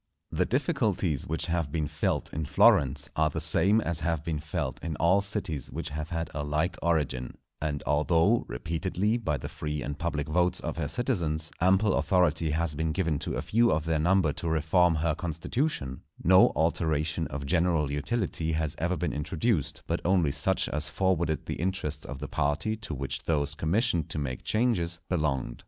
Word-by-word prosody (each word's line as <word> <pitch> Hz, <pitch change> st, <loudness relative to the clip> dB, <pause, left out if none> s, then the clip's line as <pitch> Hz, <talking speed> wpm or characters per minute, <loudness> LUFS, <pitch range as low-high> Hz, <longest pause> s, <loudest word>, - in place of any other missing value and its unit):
The -, -, +1 dB
difficulties 70 Hz, -5 st, 0 dB
which 80 Hz, +1 st, -1 dB
have 85 Hz, -4 st, -1 dB
been 80 Hz, -2 st, -1 dB
felt 75 Hz, +2 st, -2 dB
in 80 Hz, -1 st, -3 dB
Florence 70 Hz, +1 st, +4 dB
are 80 Hz, 0 st, +3 dB
the -, -, -3 dB
same 100 Hz, +6 st, +3 dB
as 85 Hz, -5 st, 0 dB
have 80 Hz, -2 st, -1 dB
been 80 Hz, -3 st, -1 dB
felt 75 Hz, -3 st, -4 dB
in 80 Hz, -2 st, -3 dB
all 85 Hz, +6 st, +3 dB
cities 95 Hz, -, -4 dB
which -, -, -5 dB
have 75 Hz, +2 st, -5 dB
had 85 Hz, -1 st, -3 dB
a 75 Hz, -, -3 dB
like 75 Hz, +5 st, 0 dB
origin; 70 Hz, -7 st, -1 dB, 0.2 s
and 75 Hz, -1 st, -2 dB
although, 80 Hz, +9 st, +3 dB
repeatedly, 95 Hz, +7 st, -1 dB
by 80 Hz, -11 st, -1 dB
the -, -, -6 dB
free 75 Hz, -1 st, -4 dB
and 70 Hz, 0 st, -5 dB
public 75 Hz, -3 st, -2 dB
votes 90 Hz, +3 st, +1 dB
of -, -, -4 dB
her 75 Hz, -3 st, -1 dB
citizens, 80 Hz, -, -1 dB
ample 95 Hz, +3 st, +4 dB
authority 85 Hz, -4 st, +2 dB
has 80 Hz, 0 st, 0 dB
been 80 Hz, +2 st, -1 dB
given 80 Hz, -5 st, 0 dB
to -, -, -3 dB
a -, -, -2 dB
few 115 Hz, +2 st, +3 dB
of 75 Hz, 0 st, 0 dB
their 80 Hz, -1 st, +1 dB
number 85 Hz, -2 st, +3 dB
to 85 Hz, -, -3 dB
reform 80 Hz, +2 st, +3 dB
her 80 Hz, 0 st, +1 dB
constitution, 85 Hz, -, -2 dB, 0.2 s
no 95 Hz, +1 st, +6 dB
alteration 80 Hz, -1 st, 0 dB
of 70 Hz, +1 st, -5 dB
general 80 Hz, -2 st, +1 dB
utility 80 Hz, +2 st, -1 dB
has 80 Hz, -2 st, -1 dB
ever 90 Hz, +2 st, 0 dB
been 90 Hz, -, -1 dB
introduced, 75 Hz, -, -1 dB
but 85 Hz, -, -1 dB
only 90 Hz, -5 st, +3 dB
such -, -, 0 dB
as 75 Hz, +1 st, -1 dB
forwarded 85 Hz, -5 st, 0 dB
the -, -, -4 dB
interests 85 Hz, -5 st, -2 dB
of 70 Hz, -, -6 dB
the 70 Hz, +1 st, -6 dB
party 80 Hz, +10 st, 0 dB
to 105 Hz, -8 st, -6 dB
which 70 Hz, 0 st, -4 dB
those 75 Hz, -2 st, 0 dB
commissioned 85 Hz, -, 0 dB
to -, -, -4 dB
make 65 Hz, -4 st, -3 dB
changes 105 Hz, -8 st, 0 dB
belonged. 75 Hz, -8 st, -1 dB
80 Hz, 180 wpm, -28 LUFS, 75-90 Hz, 0.2 s, no